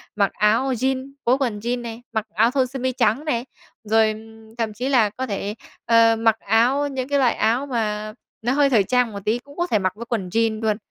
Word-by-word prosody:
mặc 200 -1 +2
áo 225 +6 +2
jeans 260 +2 -2
phối 250 +3 +4
quần 235 -7 -2
jeans 240 +2 -2
này, 230 0 -7
mặc 220 -2 -1
áo 225 +6 +3
thun 260 -2 +1
sơ 270 +1 -7
mi 260 +1 0
trắng 245 +3 +1
này, 245 -5 -1 0.4
rồi, 220 +1 +3
ừm, 220 +1 -13
thậm 225 -2 -2
chí 250 +6 -3
là 230 -6 +4
có 255 +5 -5
thể, 205 +1 -3 0.3
ờ, 230 -1 +5
mặc 225 -1 +2
áo 245 +7 +2
những 260 -2 -4
cái 285 - +2
loại 250 -4 +3
áo 235 +6 +1
mà 215 -4 -2 0.3
nó 240 +3 0
hơi 285 0 +3
thời 220 -7 +4
trang 250 +1 +1
một 200 - -6
tí 225 +3 +1
cũng 285 +3 -17
có 350 0 0
thể 215 - +1
mặc 185 -1 -1
với 235 +2 -8
quần 220 -6 -3
jeans 225 +2 0
luôn. 215 -2 +1
230 Hz, 235 wpm, -22 LUFS, 215-255 Hz, 0.4 s, ờ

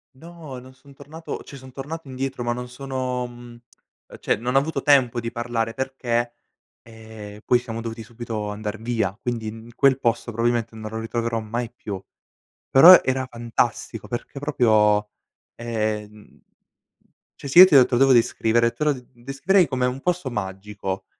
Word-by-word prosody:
No, 160 -3 -10
non 130 +1 -14
son 140 +2 -19
tornato, 155 +4 -8
cioè 140 - -12
son 130 -1 -12
tornato 145 +2 -7
indietro, 130 -1 -4
ma 120 - -1
non 125 +1 -4
sono, 130 -1 -4
mhmm, 120 0 -12 0.6
cioè - - +1
non 125 +5 -3
ho - - +7
avuto 160 +3 -3
tempo 130 -5 +3
di 115 - -4
parlare, 115 -1 -2
perché, 120 -3 -2 0.5
ehm, 110 -2 -12
poi 125 - +4
siamo 115 -2 -6
dovuti 115 0 -6
subito 110 -2 -5
andar 105 +1 -5
via, 110 -4 -1
quindi 115 -1 -5
quel 135 0 +3
posto 115 -1 -1
probabilmente, 115 0 0
non 110 -1 -7
lo 110 - -4
ritroverò 115 0 -2
mai 115 +2 -4
più, 100 -3 -7 0.7
però 170 +7 +10
era 130 0 0
fantastico 120 -1 -2
perché 120 +3 -6
proprio, 105 -7 +2 0.5
ehm 110 -2 -4 1.0
cioè 140 - -6
si 170 - +6
e 185 - +13
te 180 -6 +3
ho 125 - +6
te - - -7
lo 120 - +1
devo 135 -1 +5
descrivere 115 0 +2
te 150 - -4
lo 150 -1 +3 0.2
descriverei, 135 +9 +1
come 130 -1 0
un 130 +2 -3
posto 180 -5 -1
magico, 95 -2 -5
120 Hz, 165 wpm, -23 LUFS, 110-130 Hz, 1.0 s, e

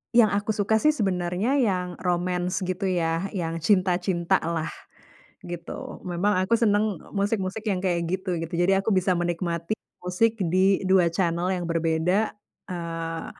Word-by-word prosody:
Yang 230 -3 +6
aku 205 +2 0
suka 205 +1 +1
sih, 305 +5 +3
sebenarnya 195 +4 0
yang 180 -7 0
romance 180 +1 -1
gitu 185 +2 -2
ya, 170 0 0
yang 165 -2 -2
cinta-cinta 180 0 +2
lah, 165 -1 -2 0.8
gitu. 175 -1 -7
Memang 185 +3 0
aku 190 - -5
seneng 210 -5 +2
e - - -16
musik-musik 200 0 -1
yang 195 -4 0
kayak 175 -2 0
gitu, 185 +1 -2
gitu. 165 +1 -5
Jadi 190 +2 +4
aku 195 +3 +1
bisa 185 -1 +2
menikmati 170 0 -2 0.3
musik 220 +6 +2 0.2
di 190 +1 +3
2 185 -2 +4
channel 170 0 0
yang 175 - -3
berbeda, 165 +5 +1 0.3
eee, 165 -2 -4
180 Hz, 150 wpm, -25 LUFS, 170-200 Hz, 0.8 s, Yang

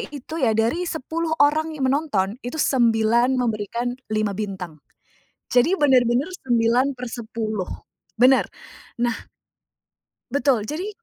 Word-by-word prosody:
itu 290 +2 -7
ya, 230 -4 +3
dari 235 +11 +1
10 320 +2 -3
orang 310 +2 +2
yang 265 - 0
menonton, 245 -8 0
itu 245 - -5
9 235 -1 +3
memberikan 235 0 -1 0.2
5 215 -1 +1
bintang 190 -6 -5 0.7
jadi 250 +8 +4
bener-bener 255 -1 +3 0.2
9/10 235 -3 -1 0.5
bener, 260 +2 +5 0.5
nah 240 -1 +1 1.2
Betul, 255 -6 +2
jadi 340 - -4
245 Hz, 105 wpm, -23 LUFS, 225-280 Hz, 1.2 s, bener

